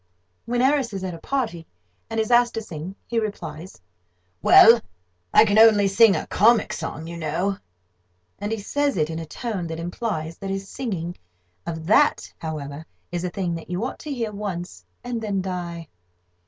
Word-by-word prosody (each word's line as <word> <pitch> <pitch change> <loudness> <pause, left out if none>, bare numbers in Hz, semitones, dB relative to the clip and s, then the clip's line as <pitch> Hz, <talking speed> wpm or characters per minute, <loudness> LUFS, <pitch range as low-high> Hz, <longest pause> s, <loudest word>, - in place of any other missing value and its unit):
When 240 +1 0
Harris 265 -3 +2
is 190 -1 -4
at 185 -1 -3
a 165 - -8
party, 220 -9 -3 0.4
and 225 0 -2
is 220 +1 0
asked 240 0 +4
to 225 - -2
sing, 175 0 -7
he 235 0 0
replies: 175 - -6 0.6
"Well, 230 +1 +8 0.5
I - - +7
can 205 0 +3
only 215 -3 +7
sing 200 +1 +6
a - - -2
comic 230 +3 +3
song, 160 -1 -5
you 170 +1 -7
know;" 170 +5 -1 0.8
and 205 +1 -3
he 225 - -1
says 285 +4 -1
it 155 0 +1
in 160 - -4
a 165 - -7
tone 200 - -4
that 165 0 -5
implies 165 -2 -4
that 195 - -5
his 195 0 -3
singing 185 -10 -4 0.5
of 160 -1 -4
that, 290 - +3
however, 150 -2 -5 0.3
is 175 0 -3
a 180 - -1
thing 175 -1 -2
that 165 0 -7
you 180 +6 -2
ought - - -5
to 300 - -7
hear 230 -5 -2
once, 180 - -5 0.2
and 240 -2 -3
then 205 -3 -1
die. 175 -3 -4
195 Hz, 180 wpm, -23 LUFS, 165-225 Hz, 0.8 s, Well